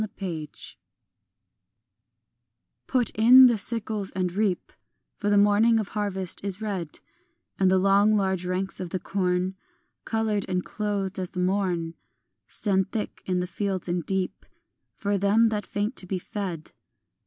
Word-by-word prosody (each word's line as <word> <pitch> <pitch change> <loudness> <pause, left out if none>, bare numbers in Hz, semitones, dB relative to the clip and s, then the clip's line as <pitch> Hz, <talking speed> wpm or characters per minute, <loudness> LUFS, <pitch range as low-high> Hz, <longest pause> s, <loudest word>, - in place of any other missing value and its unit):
MESSIDOR 175 -7 -7 2.1
PUT 250 -3 +1
in 250 +4 +8
the 235 -4 +4
sickles 215 -2 0
and 185 -2 -1
reap; 200 -2 -1 0.4
For 205 - -1
the 205 - +4
morning 210 +3 +4
of 210 - -3
harvest 195 -4 -2
is 200 -1 0
red, 195 -8 -4 0.6
And 190 -1 +4
the 190 - +4
long 200 +3 +4
large 190 -3 0
ranks 185 +1 -2
of 180 - -4
the 185 - -3
corn 185 0 -1 0.5
Coloured 220 -3 -1
and 180 -1 -1
clothed 200 -3 -2
as 185 -1 -3
the 180 - -6
morn 180 -3 0 0.5
Stand 190 -2 0
thick 220 - -4
in 180 -1 0
the - - -1
fields 190 0 -3
and 175 -1 -1
deep 190 0 -3 0.5
For 200 -1 -1
them 210 +4 +4
that 210 -1 -3
faint 210 +5 -2
to 185 - 0
be 190 - -2
fed. 180 -4 -5
195 Hz, 145 wpm, -26 LUFS, 185-210 Hz, 2.1 s, in